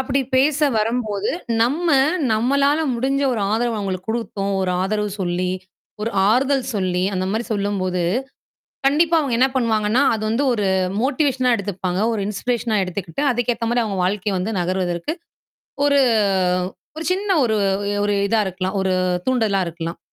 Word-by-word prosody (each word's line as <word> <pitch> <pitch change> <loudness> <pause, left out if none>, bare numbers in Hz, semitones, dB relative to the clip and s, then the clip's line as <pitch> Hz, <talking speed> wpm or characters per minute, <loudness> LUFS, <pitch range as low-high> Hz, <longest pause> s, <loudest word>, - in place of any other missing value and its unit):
அப்படி 265 +1 0 0.2
பேச 280 +2 +3 0.2
வரும்போது 215 -2 -1 0.3
நம்ம, 290 +9 0 0.5
நம்மளால 280 +6 +2 0.2
முடிஞ்ச 265 +4 0
ஒரு 230 - -2
ஆதரவ 235 +1 0
அவங்களுக்கு 185 -1 -4
குடுத்தோம் 205 -3 -2
ஒரு 185 - 0
ஆதரவு 210 +1 -1
சொல்லி, 180 0 -1 0.5
ஒரு 225 - -1 0.2
ஆறுதல் 265 +3 +2
சொல்லி 185 -2 0
அந்த 185 0 -1
மாரி 220 +3 -1
சொல்லும்போது, 195 -3 -1 0.8
கண்டிப்பா 325 +4 +3
அவுங்க 280 -5 -1
என்ன 260 - +5
பண்ணுவாங்கன்னா, 225 -1 +2
அது 220 -1 -3
வந்து 230 +6 +1
ஒரு 210 -3 -1 0.4
மோட்டிவேஷனா 260 -3 +1
எடுத்துப்பாங்க. 190 -2 -3
ஒரு 220 - -2
இன்ஸ்பிரேஷனா 225 +2 -1
எடுத்துக்கிட்டு, 180 - -5
அதுக்கு 245 0 0
ஏத்த 230 - -3
மாரி 240 0 +2
அவுங்க 205 -3 -3
வாழ்க்கைய 195 +1 -1
வந்து 210 +5 -2
நகருவதற்கு 180 - -1 0.7
ஒரு 285 0 +4 1.0
ஒரு 320 - -4
சின்ன 395 +2 -2
ஒரு 220 -2 +1 0.5
ஒரு 205 - +1
இதா 225 +2 +1
இருக்கலாம். 185 +1 -3
ஒரு 190 -1 0 0.3
தூண்டுதலா 220 -6 +1
இருக்கலாம். 170 0 -5
220 Hz, 145 wpm, -21 LUFS, 190-255 Hz, 1.0 s, என்ன